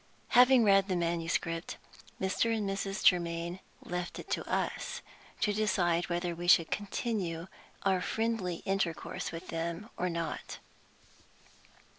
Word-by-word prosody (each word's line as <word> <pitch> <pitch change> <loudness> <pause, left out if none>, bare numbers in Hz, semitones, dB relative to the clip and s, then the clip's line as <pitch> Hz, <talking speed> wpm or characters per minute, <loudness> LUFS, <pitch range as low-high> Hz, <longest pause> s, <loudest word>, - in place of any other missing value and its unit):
Having 250 0 +7
read 195 -2 +5
the 185 - 0
manuscript, 170 0 -1 0.4
Mr. 190 +4 +1
and 210 -2 -1
Mrs. 195 +1 -2
Germaine 170 0 +2 0.2
left 180 0 -4
it - - -9
to - - 0
us - - -2 0.4
to 210 - +2
decide 180 -5 +1
whether 175 0 -1
we 175 +1 -5
should 170 -3 +6
continue 195 -5 -2 0.4
our 190 -2 +2
friendly 220 -5 -1
intercourse 190 -4 -2
with 165 +2 -8
them 170 +5 -4
or 180 - 0
not. 170 -1 -4
180 Hz, 125 wpm, -31 LUFS, 170-200 Hz, 0.4 s, Having